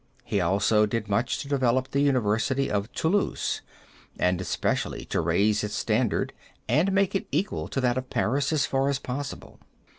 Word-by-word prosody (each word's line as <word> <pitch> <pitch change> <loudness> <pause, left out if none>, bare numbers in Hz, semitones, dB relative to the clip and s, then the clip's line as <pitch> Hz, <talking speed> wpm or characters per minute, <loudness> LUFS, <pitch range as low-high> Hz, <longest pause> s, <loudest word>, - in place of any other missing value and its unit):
He 100 - 0
also 100 +4 +3
did 105 0 -2
much 105 +4 0
to - - -11
develop 130 -2 +1
the 140 - +1
University 130 0 +1
of 105 +2 -1
Toulouse, 190 +5 0 0.6
and 90 0 +1
especially - - -1
to - - -1
raise 100 +6 +2
its 105 0 -3
standard 115 0 0 0.3
and 175 +6 +3
make 195 0 +2
it 195 - -1
equal 200 - -1
to - - -3
that 125 0 +2
of 130 0 -9
Paris 135 +4 0
as 155 -3 +2
far 135 +1 +1
as 140 - +1
possible. 140 +1 -6
125 Hz, 170 wpm, -26 LUFS, 105-140 Hz, 0.6 s, also